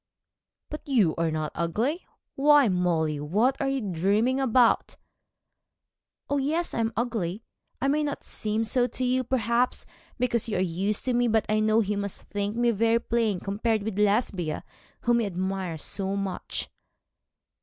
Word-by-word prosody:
'But 300 - -7
you 210 - +3
are 165 0 0
not 155 -1 -2
ugly. 230 - -1 0.3
Why, 290 -1 +5
Molly, 170 -5 +1
what 210 - +1
are 275 - 0
you 270 -1 -1
dreaming 205 +7 +1
about?' 250 -2 +3 1.3
'Oh, 285 - 0
yes, 320 +5 0
I - - -2
am 225 0 +1
ugly. 220 -4 -2 0.4
I 270 - 0
may 295 +2 +2
not 290 -1 -3
seem 215 +1 -2
so 245 +2 +2
to 255 +2 -2
you, 255 +1 +1
perhaps, 240 0 0 0.3
because 235 -2 0
you 210 - -1
are - - 0
used 190 +3 0
to 255 - +1
me, 245 0 +2
but 220 -1 +2
I 215 0 +1
know 215 +1 +3
he 210 -1 -1
must 200 -1 -4
think 205 +1 -3
me 240 0 +3
very 230 +1 +2
plain 230 -4 0
compared 215 +2 -1
with 205 -1 -3
Lesbia, 200 -6 +1 0.4
whom 240 0 +2
he 230 - 0
admires 185 -3 -3
so 195 -1 -2
much.' 195 -2 -3
220 Hz, 165 wpm, -26 LUFS, 195-245 Hz, 1.3 s, Why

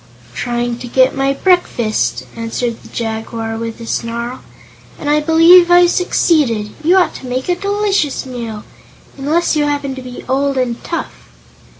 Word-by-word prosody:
"Trying 240 - -2
to 245 - -7
get 260 +2 +3
my 275 0 +1
breakfast," 275 - +1
answered 230 0 -3
the - - -14
Jaguar 225 0 -4
with 230 0 -5
a 230 - -8
snarl, 235 +2 -3 0.6
"and 295 - -7
I 295 +1 +3
believe 330 +3 +6
I've 350 0 +6
succeeded. 265 - +1
You 350 +5 +4
ought 365 - +3
to 260 - -10
make 255 +1 -3
a 355 - +2
delicious 400 -7 -1
meal 230 -4 -6 0.5
unless 310 +5 0
you 295 -1 +2
happen 285 -2 -2
to 260 - -7
be 250 -1 -9
old 275 +1 0
and 245 -2 -2
tough." 335 - -6
265 Hz, 160 wpm, -16 LUFS, 235-325 Hz, 0.6 s, believe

